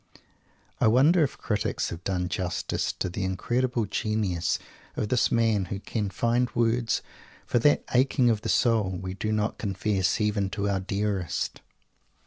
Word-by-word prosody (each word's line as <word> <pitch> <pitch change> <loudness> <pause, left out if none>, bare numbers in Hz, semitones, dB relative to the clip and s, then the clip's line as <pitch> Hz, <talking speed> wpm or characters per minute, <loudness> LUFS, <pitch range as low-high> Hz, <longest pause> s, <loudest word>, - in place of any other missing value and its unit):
I - - +4
wonder 145 +9 +5
if 140 - -2
critics 105 -4 -1
have 85 +1 -7
done 90 -2 -1
justice 90 -2 -2
to - - -2
the 95 +2 -4
incredible 120 +5 0
genius 100 -4 -1 0.4
of 105 - -2
this 125 - +2
man 115 -4 +2
who 95 +2 -5
can 105 0 -3
find 120 +6 +1
words 115 0 +1 0.4
for 120 - +1
that 145 +5 +3
aching 130 0 +3
of 110 -3 +2
the - - -4
soul 115 -5 +3
we 95 +1 -5
do 110 +3 -3
not 105 0 -1
confess 100 -2 0
even 105 -2 +1
to 100 0 -2
our 100 -1 +1
dearest? 100 -3 -2
105 Hz, 155 wpm, -27 LUFS, 95-115 Hz, 0.4 s, wonder